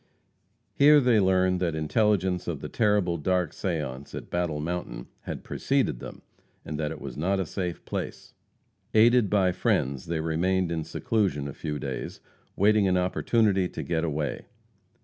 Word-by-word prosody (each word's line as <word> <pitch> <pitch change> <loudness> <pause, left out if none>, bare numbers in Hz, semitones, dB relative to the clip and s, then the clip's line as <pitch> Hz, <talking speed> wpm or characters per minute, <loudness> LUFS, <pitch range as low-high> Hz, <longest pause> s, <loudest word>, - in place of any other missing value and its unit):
Here 150 +1 +7
they 125 -5 +4
learned 95 -1 +3
that 85 -3 -1
intelligence 95 +2 +1
of - - -3
the - - -6
terrible 105 -6 +1
dark 90 +1 0
seance 75 -7 -4
at - - -8
Battle 85 -4 -1
Mountain 85 -6 -4 0.2
had - - -5
preceded 130 - 0
them, - - -9 0.4
and 75 0 -5
that 75 -1 -1
it - - -7
was 65 -3 -7
not 95 +7 0
a 95 - 0
safe 90 0 -4
place. - - -5 0.6
Aided 115 -1 +5
by 95 -2 +3
friends, 70 -5 0
they 85 -1 -1
remained 85 +3 0
in 80 -1 -2
seclusion 95 -11 -1
a 70 - -6
few 75 -2 -4
days, 65 -2 -5 0.4
waiting 105 0 +4
an 90 -1 +2
opportunity 95 +1 +2
to - - -6
get 80 -1 -1
away. 75 -3 -3
90 Hz, 160 wpm, -27 LUFS, 80-100 Hz, 0.6 s, Here